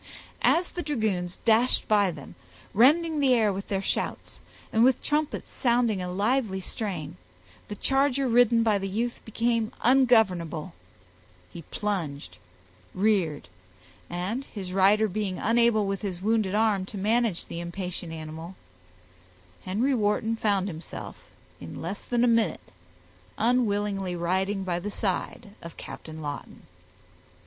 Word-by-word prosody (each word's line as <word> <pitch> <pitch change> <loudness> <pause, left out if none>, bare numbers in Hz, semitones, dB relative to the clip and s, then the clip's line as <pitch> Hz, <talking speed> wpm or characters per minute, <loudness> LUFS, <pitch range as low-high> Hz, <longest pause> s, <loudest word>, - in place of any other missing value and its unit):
As 350 +2 +3
the 350 - -5
dragoons 215 - -1
dashed 235 +2 +3
by 205 -3 +4
them, 150 -5 -9 0.4
rending 305 - +4
the 265 -3 +4
air 215 -4 +2
with 195 +1 -6
their 195 -1 -1
shouts, - - -3 0.3
and 220 +1 +4
with 260 0 +3
trumpets 300 0 -1
sounding 235 -5 +1
a 180 0 -4
lively 210 +1 0
strain, 180 - -4 0.5
the 205 - -6
charger 270 +3 +1
ridden 235 -1 +4
by 215 -3 +2
the 195 - -3
youth 230 +5 -2
became 230 0 0
ungovernable—he 160 - 0
plunged, 150 - -3 0.6
reared, 185 - +1 0.6
and 185 +9 -3
his 190 -7 -7
rider 200 +3 +4
being 195 -2 -3
unable 230 -1 +3
with 195 0 -2
his 190 -4 -4
wounded 210 -1 +1
arm, 215 -3 +2
to 205 - -7
manage 215 -1 +1
the 170 - -6
impatient 175 0 -5
animal, 160 +3 -7 1.1
Henry 225 +9 +1
Wharton 220 0 +1
found 200 -4 +1
himself, 165 -3 -8 0.3
in 80 - -8
less 185 +5 -5
than 240 -1 0
a - - +5
minute, 230 -6 +1 0.7
unwillingly 205 -5 +1
riding 190 +3 0
by 175 -2 -1
the 200 +4 -4
side 200 +2 -3
of 170 - -10
Captain 155 -1 -9
Lawton. 145 -1 -7
205 Hz, 130 wpm, -27 LUFS, 180-230 Hz, 1.1 s, a